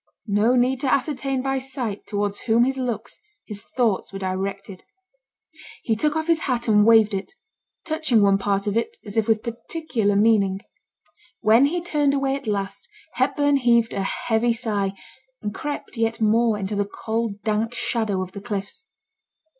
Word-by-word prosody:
No 215 +3 +2
need 250 +1 +2
to 265 -1 0
ascertain 270 -1 0
by 270 0 0
sight 255 -6 -5
towards 205 -1 -2
whom 230 0 +3
his 265 +1 0
looks, 235 -4 -4 0.3
his 205 -2 -7
thoughts 230 -5 -1
were 195 - -6
directed. 195 0 -4 1.0
He 225 - +1
took 300 +7 0
off 315 0 -1
his 335 -1 +2
hat 250 -7 -1
and 210 -1 +5
waved 220 -2 +6
it, 195 - -4 0.5
touching 315 -9 +2
one 195 0 +4
part 200 0 0
of 205 0 -1
it 230 - -1
as 205 - -7
if 225 -1 +1
with 220 -1 +2
particular 235 -3 -2
meaning. 200 -2 +3 0.8
When 225 +5 +5
he 345 +3 -2
turned 295 -5 +1
away 275 -1 0
at 275 -3 -7
last, 195 -2 -3 0.2
Hepburn 280 +2 +2
heaved 235 -3 +3
a 200 - -1
heavy 225 +4 0
sigh, 210 -4 -1 0.5
and 205 -1 -3
crept 290 +3 -5
yet 225 0 0
more 225 0 +3
into 205 +1 -3
the 200 0 0
cold 220 -2 -3
dank 220 +2 -1
shadow 215 -7 -1
of 185 - -9
the 200 - -8
cliffs. 205 - -5
225 Hz, 170 wpm, -23 LUFS, 205-260 Hz, 1.0 s, waved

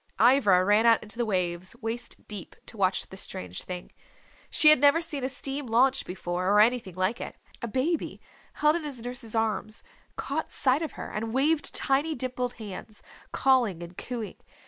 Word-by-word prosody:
Ivra 215 -6 +5
ran 210 +3 +4
out 230 -1 +5
into 220 +2 -7
the 240 - +1
waves 180 -1 -2
waist 230 +2 -4
deep 205 -4 -7
to - - -8
watch 190 -2 +1
the 190 - -12
strange 90 - -5
thing. 180 -1 -7 0.6
She 305 - +6
had 305 - +6
never 285 +3 +5
seen 320 -5 -3
a 260 - 0
steam 275 +1 -4
launch 255 +4 +3
before, 180 0 -2
or 205 +1 +5
anything 225 -4 +2
like 185 +6 -1
it. - - -6 0.3
A 235 - -3
baby, 270 +9 -1 0.3
held 300 +1 +3
in 340 - -6
his 270 -6 -6
nurse's 245 -2 -2
arms, 215 -1 -1 0.3
caught - - -3
sight 265 +2 +2
of 320 - -4
her - - -7
and 220 +1 -4
waved 295 +3 +1
tiny 290 +4 +1
dimpled 250 0 -3
hands, 215 0 -9 0.3
calling 240 -10 +2
and 170 +1 -10
cooing. 235 -1 -6
230 Hz, 180 wpm, -27 LUFS, 200-265 Hz, 0.6 s, She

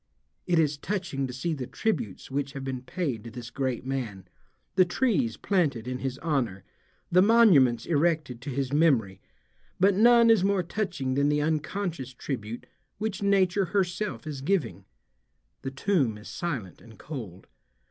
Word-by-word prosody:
It 175 -2 +2
is 150 -2 +2
touching 175 -9 -2
to - - -6
see 160 +7 -2
the 130 -5 -5
tributes 130 - -3
which 140 0 -2
have 135 - -6
been 130 -2 -4
paid 130 - -3
to 115 - -8
this 120 +1 -8
great 130 -3 -2
man, 120 -8 -4 0.5
the 185 - +6
trees 175 - 0
planted 145 - 0
in 125 0 -3
his 130 -1 -3
honor, 125 - -1 0.5
the 180 +1 +6
monuments 180 - +5
erected 155 -6 0
to 140 - -6
his 135 0 -2
memory, 120 - +2 0.6
but 195 +2 +5
none 235 +3 +6
is 215 -5 +4
more 195 -1 +2
touching 165 -8 -2
than 140 +2 +2
the 150 0 +1
unconscious 155 -3 -2
tribute 120 -4 -5 0.3
which 215 -3 -3
nature 195 -1 +3
herself 180 - -1
is 145 -3 -5
giving. 125 - -1 0.8
The 135 - -3
tomb 135 - 0
is 105 - -12
silent 135 - -4
and 110 -2 -15
cold. 110 - -8
140 Hz, 155 wpm, -27 LUFS, 125-180 Hz, 0.8 s, the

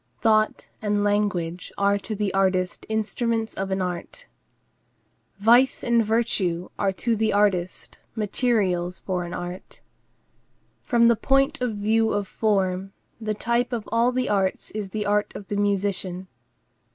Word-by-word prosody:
Thought 215 -1 +2
and 205 -1 0
language 200 -4 -1
are 200 0 +2
to 215 +2 -5
the 205 -1 -1
artist 185 -2 0
instruments 225 +1 -1
of 195 0 -3
an 190 0 0
art. 180 - -6 1.1
Vice 240 +6 +4
and 235 -1 +3
virtue 205 -6 0
are 195 - +2
to 230 +4 0
the 220 0 +1
artist 195 -3 0 0.2
materials 200 -5 0
for 180 -2 -3
an 175 - -7
art. 175 +1 -7 1.0
From 235 -1 +4
the 235 - +5
point 275 +5 +2
of 245 -4 -1
view 220 +2 +2
of 205 -1 -1
form, 195 -3 0 0.3
the 215 -2 -2
type 235 +3 0
of 230 -4 -3
all 235 +2 +3
the 255 0 -1
arts 195 -2 0
is 210 -2 -4
the 210 +2 -3
art 205 0 +1
of 200 - -9
the 205 - -2
musician. 195 -2 -1
205 Hz, 145 wpm, -24 LUFS, 190-225 Hz, 1.1 s, the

